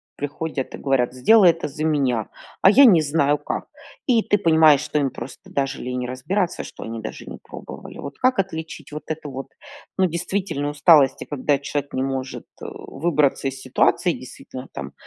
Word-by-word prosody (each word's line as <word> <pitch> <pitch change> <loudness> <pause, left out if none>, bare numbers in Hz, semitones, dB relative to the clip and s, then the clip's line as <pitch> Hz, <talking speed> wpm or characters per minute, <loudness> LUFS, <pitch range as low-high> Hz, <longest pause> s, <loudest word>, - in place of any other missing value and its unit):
приходят 145 -1 -4
и - - -6
говорят: 130 -3 +1
"Сделай 180 - +6
это 165 -2 -5
за 150 +2 -6
меня, 135 -8 +1 0.4
а 190 - +8
я 275 +6 +8
не 175 -10 +6
знаю 145 -1 +2
как". - - -4 0.4
И 235 -4 +3
ты 205 - +2
понимаешь, 160 -5 +5
что 150 - -2
им 140 -3 +1
просто 120 +2 -10
даже 135 -1 -1
лень 125 0 -3
разбираться, 170 +10 -2
что - - -11
они 115 0 -5
даже 110 - -8
не - - -8
пробовали. - - -10
Вот 140 - -8
как 255 -2 +2
отличить 160 -5 -4
вот 150 +1 -6
эту 155 -1 -5
вот, 135 0 -6 0.5
ну, 190 - +5
действительно 170 -3 -2
усталость, 145 -2 +5
и - - -5
когда 145 0 0
человек 145 0 -4
не 130 - -1
может, 130 -1 -4 0.2
э, - - -5
выбраться 150 -4 -1
из 135 0 -5
ситуации, 130 +7 +2
действительно 130 0 -10
там - - -7
145 Hz, 185 wpm, -22 LUFS, 135-165 Hz, 0.5 s, а